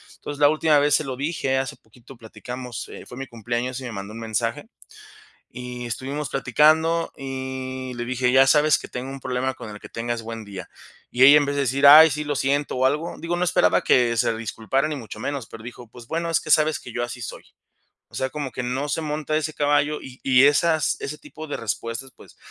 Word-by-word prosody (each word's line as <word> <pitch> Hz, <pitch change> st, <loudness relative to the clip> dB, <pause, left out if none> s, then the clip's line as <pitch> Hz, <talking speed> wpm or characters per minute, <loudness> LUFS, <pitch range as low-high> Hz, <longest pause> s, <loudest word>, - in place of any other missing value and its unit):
Entonces, 145 Hz, 0 st, -8 dB
la 145 Hz, -, +7 dB
última 155 Hz, -1 st, +3 dB
vez 145 Hz, +1 st, +3 dB
se -, -, +1 dB
lo 130 Hz, -1 st, -4 dB
dije, 135 Hz, -1 st, -1 dB
hace 135 Hz, -, -4 dB
poquito 120 Hz, +3 st, -17 dB
platicamos, 125 Hz, +2 st, -8 dB
eh, -, -, -10 dB
fue 125 Hz, -, -11 dB
mi 135 Hz, -1 st, -6 dB
cumpleaños 120 Hz, +2 st, -3 dB
y 130 Hz, -, -9 dB
me 120 Hz, -, -5 dB
mandó 100 Hz, +1 st, -7 dB
un 115 Hz, -, -8 dB
mensaje, 115 Hz, -, -2 dB, 0.8 s
y 125 Hz, -1 st, -7 dB
estuvimos 135 Hz, +5 st, -4 dB
platicando, 155 Hz, +5 st, +2 dB
y 130 Hz, -1 st, -5 dB
le 120 Hz, 0 st, -4 dB
dije: 125 Hz, 0 st, 0 dB
"Ya 135 Hz, 0 st, +7 dB
sabes 150 Hz, +1 st, +4 dB
que -, -, -9 dB
tengo 125 Hz, +2 st, -6 dB
un 135 Hz, -, -7 dB
problema 130 Hz, +1 st, -2 dB
con 115 Hz, -, -9 dB
el 105 Hz, 0 st, -9 dB
que -, -, -12 dB
tengas 120 Hz, 0 st, -3 dB
buen 115 Hz, 0 st, -7 dB
día". 95 Hz, -3 st, -9 dB, 0.4 s
Y 125 Hz, +1 st, +3 dB
ella 145 Hz, +2 st, +9 dB
en 145 Hz, -, +2 dB
vez 140 Hz, 0 st, -2 dB
de 140 Hz, -, +1 dB
decir: 140 Hz, +2 st, +3 dB
"Ay, 155 Hz, +1 st, +10 dB
sí, 150 Hz, +2 st, -2 dB
lo 145 Hz, 0 st, -2 dB
siento 140 Hz, +2 st, 0 dB
o 130 Hz, +1 st, +1 dB
algo", 150 Hz, +5 st, 0 dB
digo, 170 Hz, +1 st, -2 dB
no 180 Hz, -, 0 dB
esperaba 90 Hz, -, +3 dB
que 120 Hz, -2 st, +3 dB
se 115 Hz, -1 st, +1 dB
disculpara 115 Hz, +5 st, -1 dB
ni 150 Hz, -, -3 dB
mucho 110 Hz, -4 st, -9 dB
menos, 140 Hz, 0 st, -4 dB
pero 110 Hz, -, -11 dB
dijo: 120 Hz, 0 st, -10 dB
"Pues, 120 Hz, +1 st, -13 dB
bueno, 165 Hz, +3 st, -2 dB
es 165 Hz, -, +2 dB
que 155 Hz, -, -4 dB
sabes 155 Hz, -1 st, +4 dB
que 125 Hz, -, -10 dB
yo 120 Hz, +1 st, -2 dB
así 120 Hz, 0 st, -6 dB
soy". -, -, -7 dB, 0.7 s
O -, -, -18 dB
sea, 130 Hz, -, -1 dB
como 145 Hz, -4 st, -5 dB
que 125 Hz, -, -4 dB
no 130 Hz, +4 st, -2 dB
se -, -, -1 dB
monta 155 Hz, 0 st, -2 dB
ese 155 Hz, 0 st, -3 dB
caballo, 145 Hz, +1 st, +1 dB
y 130 Hz, -1 st, -11 dB
y 130 Hz, 0 st, +5 dB
esas 155 Hz, +2 st, +2 dB
ese 150 Hz, -, -5 dB
tipo 155 Hz, 0 st, -10 dB
de 145 Hz, -, -4 dB
respuestas, 115 Hz, +4 st, -4 dB
pues, -, -, -17 dB
130 Hz, 230 wpm, -23 LUFS, 120-150 Hz, 0.8 s, Ay